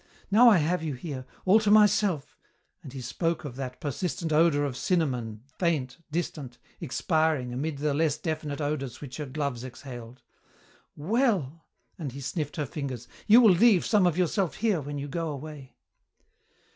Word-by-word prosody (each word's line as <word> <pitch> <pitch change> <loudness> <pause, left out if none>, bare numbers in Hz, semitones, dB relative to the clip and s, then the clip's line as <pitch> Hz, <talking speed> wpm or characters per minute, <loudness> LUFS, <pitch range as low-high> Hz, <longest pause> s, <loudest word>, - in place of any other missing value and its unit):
Now 235 +4 +8
I 210 - +6
have 170 +3 +1
you 155 -4 -3
here, 130 -2 -7 0.2
all 195 +4 +6
to 215 -1 0
myself," 210 -6 +3 0.5
and 135 - -10
he 135 0 -7
spoke 165 +6 -2
of 130 -4 -6
that 130 -1 -6
persistent 160 +2 -3
odour 155 -2 +4
of 140 -3 -2
cinnamon, 125 - -1 0.2
faint, 155 -8 0
distant, 150 -6 -4 0.2
expiring 155 -3 0
amid 145 +4 -3
the 145 +1 0
less 155 0 +1
definite 155 -2 -4
odours 140 -4 -3
which 135 -4 -8
her 150 -2 -5
gloves 140 -3 -3
exhaled, 125 -1 -10 0.7
"well," 170 - 0 0.3
and 145 -7 -5
he 140 - -7
sniffed 145 +2 -4
her 150 - -2
fingers, 130 -5 -5 0.2
"you 230 +4 +8
will 220 -6 +7
leave 200 0 +5
some 205 -5 +4
of 170 -1 0
yourself 185 0 0
here 205 -6 +1
when 145 +1 -5
you 140 +1 -4
go 165 +3 -3
away." 145 -2 -8
150 Hz, 165 wpm, -27 LUFS, 135-175 Hz, 0.7 s, Now